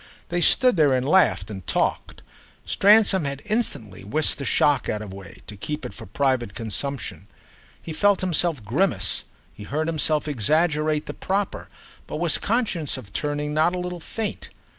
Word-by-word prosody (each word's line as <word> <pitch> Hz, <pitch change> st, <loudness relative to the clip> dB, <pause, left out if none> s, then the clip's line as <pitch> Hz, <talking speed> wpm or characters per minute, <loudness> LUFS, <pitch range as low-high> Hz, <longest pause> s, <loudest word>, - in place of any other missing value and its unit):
They 175 Hz, 0 st, 0 dB
stood 250 Hz, +3 st, +5 dB
there 145 Hz, -4 st, +4 dB
and 130 Hz, +1 st, -1 dB
laughed 110 Hz, -, +3 dB
and 95 Hz, -5 st, -8 dB
talked; -, -, -1 dB, 0.4 s
Stransom 200 Hz, -3 st, +4 dB
had 140 Hz, 0 st, -4 dB
instantly 115 Hz, -, -2 dB
whisked 150 Hz, +12 st, 0 dB
the 140 Hz, -, -4 dB
shock 145 Hz, +1 st, +2 dB
out 105 Hz, 0 st, -2 dB
of 100 Hz, -, -9 dB
the -, -, -9 dB
way, 95 Hz, -3 st, -12 dB
to 105 Hz, -, -10 dB
keep 150 Hz, +8 st, -5 dB
it 125 Hz, -, -6 dB
for 100 Hz, -, -11 dB
private 125 Hz, -1 st, 0 dB
consumption. 110 Hz, -, -3 dB, 0.5 s
He 165 Hz, -, -7 dB
felt 205 Hz, +4 st, +3 dB
himself 170 Hz, -, 0 dB
grimace, 115 Hz, -, +1 dB, 0.3 s
he -, -, -14 dB
heard 150 Hz, +9 st, -2 dB
himself 155 Hz, -2 st, 0 dB
exaggerate 150 Hz, +4 st, +1 dB
the -, -, -6 dB
proper, 195 Hz, +1 st, -3 dB, 0.4 s
but -, -, -6 dB
was 165 Hz, 0 st, 0 dB
conscious 200 Hz, -, -1 dB
of 105 Hz, -6 st, -11 dB
turning 150 Hz, 0 st, -2 dB
not 160 Hz, +4 st, +2 dB
a -, -, -3 dB
little 180 Hz, 0 st, -4 dB
faint. 215 Hz, +6 st, -5 dB
150 Hz, 170 wpm, -24 LUFS, 110-175 Hz, 0.5 s, stood